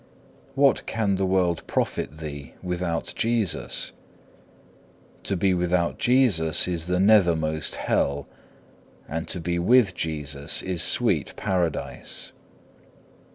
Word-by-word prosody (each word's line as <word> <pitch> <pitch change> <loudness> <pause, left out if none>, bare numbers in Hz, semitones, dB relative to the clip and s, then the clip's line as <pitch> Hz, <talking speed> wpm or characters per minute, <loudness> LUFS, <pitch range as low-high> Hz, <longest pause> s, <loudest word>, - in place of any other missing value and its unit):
2. - - -7
What 140 -2 +3
can 105 -4 0
the 95 0 0
world 90 -3 +1
profit 75 - -2
thee 70 -3 -8
without 90 -2 -2
Jesus? 115 -5 -1 1.3
To 95 - -1
be 95 +1 +2
without 90 -1 0
Jesus 110 - +4
is 85 -2 -2
the 90 0 +1
nethermost 85 -7 +3
hell, 70 0 -1 0.8
and 80 +3 -4
to 90 - -1
be 85 +1 -2
with 110 +2 +4
Jesus 75 -4 -2
is 90 -3 -2
sweet - - +1
paradise. 90 -5 -3
90 Hz, 110 wpm, -25 LUFS, 80-95 Hz, 1.3 s, Jesus